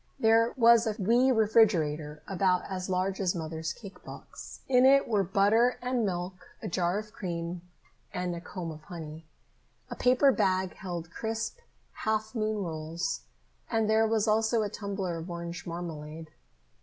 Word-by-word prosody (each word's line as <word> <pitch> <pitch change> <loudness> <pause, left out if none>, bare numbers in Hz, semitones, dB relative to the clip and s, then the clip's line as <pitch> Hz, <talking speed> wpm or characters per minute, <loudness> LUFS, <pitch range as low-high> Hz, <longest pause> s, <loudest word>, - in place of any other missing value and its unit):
There 225 0 +4
was 235 -1 +6
a 215 - -1
wee 240 +7 +4
refrigerator 170 -10 +2
about 185 -1 +1
as 185 -1 -4
large 190 +1 0
as 185 -2 +1
Mother's 160 -1 -3
cake 200 +2 -11
box. - - -10
In 250 -1 +5
it 275 +1 +6
were 210 -4 +2
butter 205 +6 +3
and 250 -1 -1
milk, 180 -1 -4
a - - -5
jar 175 +1 0
of 215 +1 -6
cream, 170 -3 -4 0.5
and 180 -1 -2
a 170 - -7
comb 175 -2 -6
of 155 0 -10
honey. 160 -3 -8 0.7
A - - -3
paper 255 +2 +4
bag 190 -5 +1
held 170 -3 -6
crisp 225 - -3 0.3
half 220 0 -2
moon 215 -3 -1
rolls, 165 +3 -3 0.5
and 225 -2 +1
there 220 +1 +4
was 220 0 +1
also 220 +1 +2
a 205 - -2
tumbler 195 -5 -4
of 165 +3 -7
orange 170 0 -6
marmalade. 160 -2 -6
195 Hz, 155 wpm, -29 LUFS, 170-220 Hz, 0.7 s, was